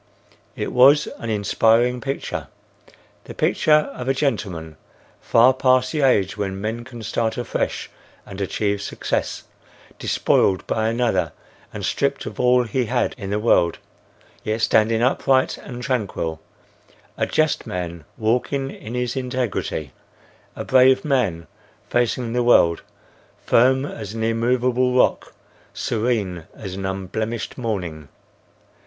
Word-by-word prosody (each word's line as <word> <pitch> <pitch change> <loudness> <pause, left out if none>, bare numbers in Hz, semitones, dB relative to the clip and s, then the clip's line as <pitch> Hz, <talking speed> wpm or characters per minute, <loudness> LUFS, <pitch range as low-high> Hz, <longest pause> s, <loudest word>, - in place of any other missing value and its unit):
It - - -3
was 140 +4 +6
an 115 - -5
inspiring 115 +4 +2
picture: 135 0 -4 0.8
the - - -9
picture 155 0 +3
of 125 - -7
a 135 - +2
gentleman, 90 - -2 0.4
far 120 +3 +5
past 130 -1 +2
the 155 - -1
age 105 -8 +3
when 95 -2 -3
men 110 +3 -3
can 120 -2 -10
start 110 +2 -1
afresh 120 - -2 0.4
and 100 0 -8
achieve 100 +1 -1
success, - - -3 0.6
despoiled 95 -2 +2
by 110 0 0
another 115 -8 0 0.4
and - - -5
stripped - - -1
of - - -7
all 125 0 +4
he 120 +2 -1
had 120 +1 0
in 100 -5 -7
the 100 - 0
world, 105 -6 +2 0.7
yet 110 +1 -2
standing 110 +1 +3
upright 130 0 +2
and 125 -1 -8
tranquil; 100 -10 -2 0.7
a - - -1
just 155 -1 0
man 85 -2 -5
walking 125 +4 0
in 110 +3 -8
his 125 -1 -2
integrity; 125 - -3 0.6
a - - -5
brave 130 +1 +5
man 110 - 0 0.5
facing 120 0 0
the 125 - +1
world; 85 -9 +4 0.6
firm 130 +3 +4
as 110 -6 -7
an 110 - -3
immovable 125 +2 +1
rock; - - +1 0.4
serene 105 -7 -1
as 95 -4 -7
an 95 0 -4
unblemished 100 +4 -4
morning. 90 - -4
115 Hz, 130 wpm, -22 LUFS, 100-125 Hz, 0.8 s, was